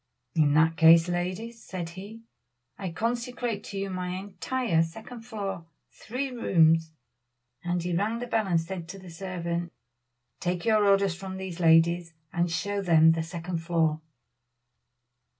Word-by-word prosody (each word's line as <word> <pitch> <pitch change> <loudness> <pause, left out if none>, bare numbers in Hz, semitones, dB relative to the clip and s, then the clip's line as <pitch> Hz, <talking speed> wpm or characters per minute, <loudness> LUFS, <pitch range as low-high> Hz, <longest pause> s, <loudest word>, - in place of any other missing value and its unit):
"In 150 -3 +3
that 160 +1 +4
case, 165 +1 +7
ladies," 185 +7 -3
said 175 -3 -5
he, 200 +6 -10 0.5
"I 190 - -5
consecrate 235 +3 -2
to 200 - -6
you 195 0 -3
my 180 -1 -3
entire 195 +2 -1
second 220 +8 -6
floor, 200 -7 -5 0.2
three 260 +4 -4
rooms," 165 -8 +3 0.7
and 175 0 -1
he 175 -1 -1
rang 210 +6 0
the 245 - -4
bell 225 -3 0
and 170 -3 +3
said 170 0 -6
to 195 - -8
the 185 -2 -11
servant, 170 -1 -4 0.7
"Take 175 +1 -2
your 215 -2 +4
orders 195 -2 +4
from 190 +2 -7
these 190 -2 -6
ladies, 165 0 +4 0.2
and 175 -1 +1
show 200 +4 -2
them 165 -3 +6
the 165 0 0
second 170 +1 -4
floor." 165 -2 0
180 Hz, 150 wpm, -27 LUFS, 165-205 Hz, 0.7 s, case